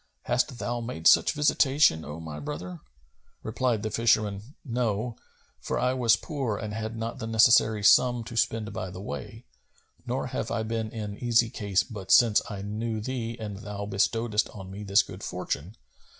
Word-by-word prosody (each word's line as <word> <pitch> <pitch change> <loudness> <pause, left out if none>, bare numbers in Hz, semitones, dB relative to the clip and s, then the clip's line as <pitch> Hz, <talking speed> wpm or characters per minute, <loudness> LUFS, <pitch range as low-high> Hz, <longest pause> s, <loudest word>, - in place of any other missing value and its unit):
Hast 125 +1 0
thou 120 0 -3
made 115 -9 -6
such - - +6
visitation, 140 - +3
O 75 +2 -7
my 80 -2 -7
brother?" 90 +4 -6 0.6
Replied 115 0 -1
the 110 - -2
fisherman, 110 +1 +1
"No: 120 -2 -1 0.4
for - - -3
I 125 0 +1
was 120 -3 +4
poor 135 - -3
and 105 0 -5
had 110 +1 -4
not 115 +3 -4
the 115 - -4
necessary 110 -1 +4
sum[FN#258] 120 +2 +5
to 115 - -8
spend 115 -1 0
by 95 - -4
the 90 +1 -9
way, 75 -8 -7 0.6
nor - - -1
have - - -3
I 110 - -1
been 110 0 -3
in 105 -2 -6
easy 115 -1 +2
case 100 -4 0
but 100 -1 -9
since 115 -4 +6
I 100 -2 -6
knew 110 +2 -3
thee 115 0 -4
and 105 -3 -6
thou 105 -1 -6
bestowedst 105 +2 0
on 95 -1 -9
me 100 +2 -7
this 100 0 +4
good - - -10
fortune. 90 +9 -4
110 Hz, 175 wpm, -27 LUFS, 100-120 Hz, 0.6 s, such